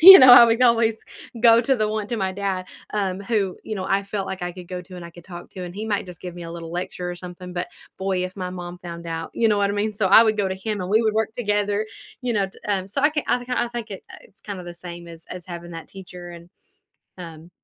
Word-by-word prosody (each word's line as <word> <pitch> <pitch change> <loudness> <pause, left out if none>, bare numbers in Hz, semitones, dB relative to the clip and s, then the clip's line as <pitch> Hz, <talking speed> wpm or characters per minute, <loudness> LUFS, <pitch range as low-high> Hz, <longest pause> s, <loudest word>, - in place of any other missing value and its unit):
you 380 +4 +13
know, 255 -1 +9
I 240 -1 +11
would 230 +2 +2
always 230 -2 +4 0.5
go 230 -1 +8
to 265 +2 +2
the 215 -2 +1
one 215 -1 -2
to 235 - -3
my 190 -3 -1
dad, 190 -1 -2 0.3
um, 195 -2 -1
who, 200 -3 -1
you 215 - -4
know, 185 -2 -4
I 195 +1 +1
felt 200 -1 -3
like 190 - -5
I 175 - -2
could 180 -1 -10
go 180 0 -5
to 180 0 -12
and 175 - -8
I 170 - -9
could 170 0 -15
talk 175 -2 -10
to, 185 - -9
and 175 0 -7
he 215 +2 -4
might 205 -3 -1
just 180 -2 -11
give 180 -1 -6
me 175 - -8
a 165 - -7
little 165 -1 -7
lecture 180 0 -4
or - - -4
something, 180 0 -9
but, 175 0 -3 0.3
boy, 190 -1 0
if 185 - -6
my 185 -2 -4
mom 180 -1 -7
found 170 -1 -8
out, 165 0 -4
you 230 - +2
know 210 -1 +3
what 200 0 +2
I 200 - -1
mean? 210 +1 0
So, 205 -2 0
I 200 +4 +9
would 220 -1 +1
go 200 -2 +2
to 190 - -2
him, 205 +2 -3
and 180 - -4
we 220 +3 +4
would 220 -1 +2
work 220 0 0
together, 205 -2 0 0.4
you 250 -1 0
know, 200 -3 +1
t 190 - -16
um, 195 -2 -1
so 275 +8 -2
I 295 - +5
can 300 -1 -2
I - - +3
think 245 0 -9
I 250 -1 +1
I - - -7
think 235 -2 -6
it 195 - -7
uh, - - -10
it's 195 +1 -20
kinda 195 -3 -6
the 175 - -7
same 170 0 -9
as 165 -1 -12
as 180 -1 -7
having 170 -1 -8
that 165 -1 -8
teacher, 180 -2 -10
and, 170 0 -12 0.7
um, 165 -1 -10
190 Hz, 295 wpm, -23 LUFS, 175-215 Hz, 0.7 s, you